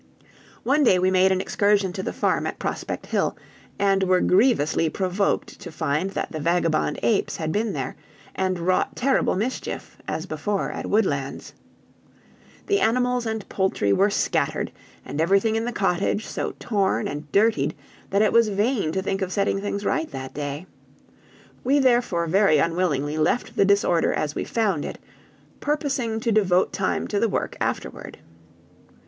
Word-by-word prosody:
One 285 +4 +3
day 195 -8 +5
we 185 +1 +2
made 190 0 +4
an 190 - +2
excursion 200 -1 +1
to 190 - -4
the - - -3
farm - - 0
at - - -4
Prospect - - -4
Hill, - - -1 0.4
and 195 -1 +2
were 185 -1 +3
grievously 180 - +3
provoked 190 +3 -1
to 175 - -9
find 155 +4 -1
that 195 - -4
the 155 - -4
vagabond 165 0 +1
apes 220 -4 +1
had 160 -1 -2
been 210 +2 -1
there, 135 -3 -4 0.4
and 185 -1 -1
wrought 180 +2 0
terrible 265 +2 +1
mischief, 225 +7 -4
as - - -3
before 205 -2 -2
at - - -5
Woodlands. 145 -11 -1 1.1
The 400 0 +2
animals 250 -2 +1
and 220 -2 -3
poultry 190 - 0
were 200 +2 +3
scattered, - - 0 0.3
and 155 - -3
everything 195 +6 +3
in 225 +1 0
the 240 - -2
cottage 200 0 0
so - - -4
torn 200 -4 0
and 145 0 -6
dirtied, 200 -9 +2 0.3
that 200 +2 +3
it 215 - +2
was 230 -1 +5
vain 205 -3 0
to 190 - -1
think 195 0 -2
of 185 -1 -2
setting 195 0 0
things 205 0 -3
right 325 -1 0
that 130 0 -7
day. 145 +3 -5 1.0
We 270 +3 +3
therefore 240 -10 +2
very 185 -1 +4
unwillingly 155 -2 0
left 155 +10 0
the 200 - +4
disorder 200 -4 +3
as 150 -1 -2
we - - -3
found 200 -10 0
it, - - -6 0.6
purposing 275 -6 -1
to 235 -1 0
devote 190 -4 +2
time 190 - -1
to 205 - 0
the 230 - +2
work - - -2
afterward. - - -4
195 Hz, 165 wpm, -24 LUFS, 170-220 Hz, 1.1 s, day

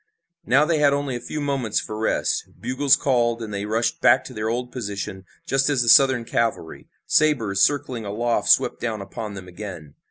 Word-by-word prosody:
Now 140 +5 +4
they 160 -1 +1
had 145 -1 +4
only 140 -2 -2
a - - -4
few 150 - -5
moments 135 -7 -1
for 110 - -6
rest. 110 +1 -1
Bugles 130 +2 +2
called 120 -3 +1
and 110 -2 -6
they 100 0 -3
rushed 115 +2 -1
back 130 - +5
to 130 - -10
their 110 -1 -3
old 125 +2 -3
position 100 -5 -6 0.2
just 135 +1 +1
as 135 -4 +1
the 115 - 0
Southern 130 -2 +5
cavalry, 115 -9 -3 0.2
sabers 115 -11 +2
circling 130 -2 +1
aloft 115 +4 -1
swept - - +3
down 110 -4 -3
upon 105 0 -7
them 95 -1 -9
again. 90 -6 -9
120 Hz, 190 wpm, -23 LUFS, 105-135 Hz, 0.2 s, back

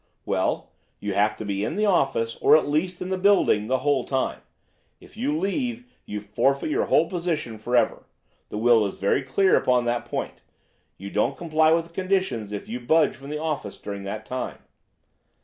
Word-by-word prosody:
"'Well, - - -1 0.3
you 105 -1 -3
have 105 +2 +2
to 110 - -6
be 100 0 -2
in 110 - -2
the 210 +1 +1
office, 135 - +1
or - - +6
at 155 - -1
least 175 +5 -1
in 180 - -6
the 190 -1 -1
building, 185 - +3
the 130 +2 +2
whole 140 -3 +2
time. 130 +1 -2 0.6
If - - -17
you 150 +2 -1
leave, 240 - -2 0.2
you 105 - -4
forfeit 135 +9 0
your - - +1
whole 165 - +3
position 165 - -3
forever. 120 +2 +1 0.4
The - - -5
will 115 0 +5
is 95 - -8
very 100 +8 +1
clear 185 +9 +3
upon 125 -1 +2
that 120 0 -1
point. - - -5 0.6
You 100 +1 -8
don't 105 - 0
comply 160 -2 +2
with 165 0 +2
the - - -24
conditions 185 - -1
if 105 - -5
you 120 +2 -4
budge 160 +7 +3
from 135 +1 -11
the 150 - -3
office 150 -10 -3
during 100 -1 -6
that 105 +2 -5
time. 130 0 -4
135 Hz, 190 wpm, -25 LUFS, 110-170 Hz, 0.6 s, or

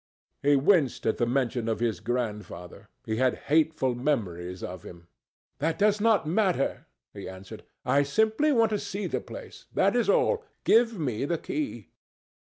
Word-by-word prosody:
He 145 +1 +4
winced 145 - +2
at 110 - +1
the 120 - +1
mention 120 -2 0
of 110 - -1
his 115 -2 0
grandfather. 105 -4 -4 0.2
He 110 -2 -2
had 130 0 +2 0.2
hateful 155 -5 +3
memories 95 - -2
of 90 -1 -6
him. 85 -1 -12 0.5
"That 160 +3 0
does 210 0 +2
not 220 -6 +3
matter," 180 -4 0 0.3
he - - -7
answered. 95 +1 -10 0.2
"I 140 - +3
simply 220 - +2
want 230 -4 +3
to 210 - 0
see 200 +1 -4
the - - -2
place—that - - -2
is - - +2
all. 465 -2 +3 0.2
Give 230 -1 +4
me 135 -7 -2
the 170 +3 0
key." 295 - -4
140 Hz, 160 wpm, -27 LUFS, -, 0.5 s, He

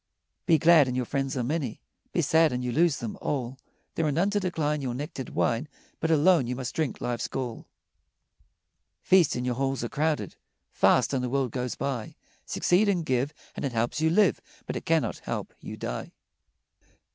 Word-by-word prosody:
Be 165 -3 +6
glad, 160 -2 +6
and 125 0 -2
your 125 - 0
friends 135 +1 -2
are 125 - 0
many; 135 -3 -2 0.3
Be 170 - +1
sad, 160 +2 +4
and 125 0 -2
you 125 - -1
lose 160 +3 +3
them 115 -3 -6
all; 130 -2 -3 0.3
There 165 - 0
are - - +1
none 175 +8 +1
to 205 - +1
decline 155 -6 -1
Your 125 -3 -3
nectared 135 -1 -5
wine, 120 +6 0 0.3
But 160 - -1
alone 160 -3 +4
you 125 - -2
must 130 +1 -4
drink 155 -5 -2
life's 120 -1 -2
gall. 125 -4 -5 1.4
Feast, 180 -5 +4
and 125 0 -2
your 125 - 0
halls 135 0 -1
are 120 - -3
crowded; 155 +1 -1 0.3
Fast, 125 +1 +3
and 130 -2 0
the 125 - -1
world 135 -2 0
goes 125 0 -3
by; 125 -6 -3 0.3
Succeed 200 +4 +2
and 175 -5 0
give, 130 0 0 0.2
And - - -5
it 135 -3 -2
helps 120 +6 -1
you 160 - +3
live, 195 +4 +3 0.2
But - - -4
it - - -6
cannot 160 -9 +1
help - - -5
you - - -8
die. - - -5
135 Hz, 190 wpm, -27 LUFS, 125-160 Hz, 1.4 s, Be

